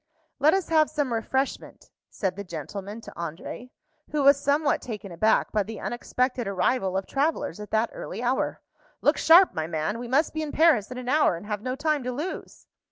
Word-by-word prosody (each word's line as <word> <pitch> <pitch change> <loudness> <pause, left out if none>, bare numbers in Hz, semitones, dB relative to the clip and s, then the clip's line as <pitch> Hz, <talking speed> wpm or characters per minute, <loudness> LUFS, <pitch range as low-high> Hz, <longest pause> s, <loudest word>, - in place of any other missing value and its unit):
"Let 305 +5 +5
us 385 -3 -2
have 310 -2 +4
some 280 -5 -1
refreshment," 265 +4 -3 0.2
said 190 -3 -2
the 200 - -6
gentleman 195 +5 -7
to - - -10
André, 170 +9 -6 0.4
who 295 -1 0
was 280 0 +6
somewhat 285 +1 +2
taken 210 -5 -7
aback 215 +6 +2
by 215 - +2
the 215 +1 -6
unexpected 250 0 -2
arrival 195 0 0
of 190 - -2
travellers 290 -3 -1
at 210 - -8
that 220 +1 +1
early 220 +6 -6
hour. 250 +2 0 0.4
"Look - - +3
sharp, 350 +4 +7
my 160 0 -2
man! 165 +7 -2
We 245 - -6
must 275 +6 +2
be 315 - -2
in 305 -2 -4
Paris 310 -10 +4
in 250 - -7
an 250 -1 -7
hour, 285 - +3
and 170 - -9
have 210 -1 -3
no 255 +2 -3
time 300 +1 0
to 250 - -1
lose." 300 +9 -6
245 Hz, 200 wpm, -26 LUFS, 200-290 Hz, 0.4 s, sharp